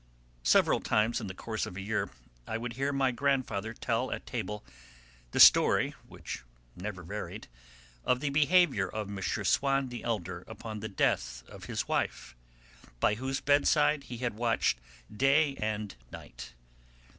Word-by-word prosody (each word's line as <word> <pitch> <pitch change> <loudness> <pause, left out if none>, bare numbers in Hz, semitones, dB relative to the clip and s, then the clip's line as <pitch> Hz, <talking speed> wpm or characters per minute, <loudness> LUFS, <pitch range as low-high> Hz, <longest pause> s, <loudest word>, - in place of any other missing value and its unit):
Several - - +4
times 110 +3 +1
in 105 - -5
the 95 - -7
course 110 +2 -3
of 90 - -8
a - - -4
year 105 +2 -1 0.4
I 110 - -2
would 115 +1 -5
hear 135 +4 -1
my 135 -2 +2
grandfather 120 -5 0
tell 120 +2 -1
at - - -4
table 105 -4 -4 0.7
the - - -2
story, - - +7
which - - -7 0.3
never 95 -1 -6
varied, 85 - -6 0.6
of 125 - +2
the 145 0 -1
behaviour 155 - +4
of 105 -2 -4
M. 100 -1 -5
Swann 130 +6 +1
the 120 -1 -7
elder 95 -6 -3
upon 110 -2 -7
the 110 +1 -5
death 65 -9 0
of - - -11
his - - -3
wife, 60 - -2 0.6
by 105 - +3
whose 130 +4 -3
bedside 145 0 +3
he 120 - -7
had 120 -1 -2
watched 115 - +1 0.4
day 140 +4 +3
and 105 -1 -2 0.2
night. - - -10
115 Hz, 155 wpm, -30 LUFS, 105-135 Hz, 0.7 s, story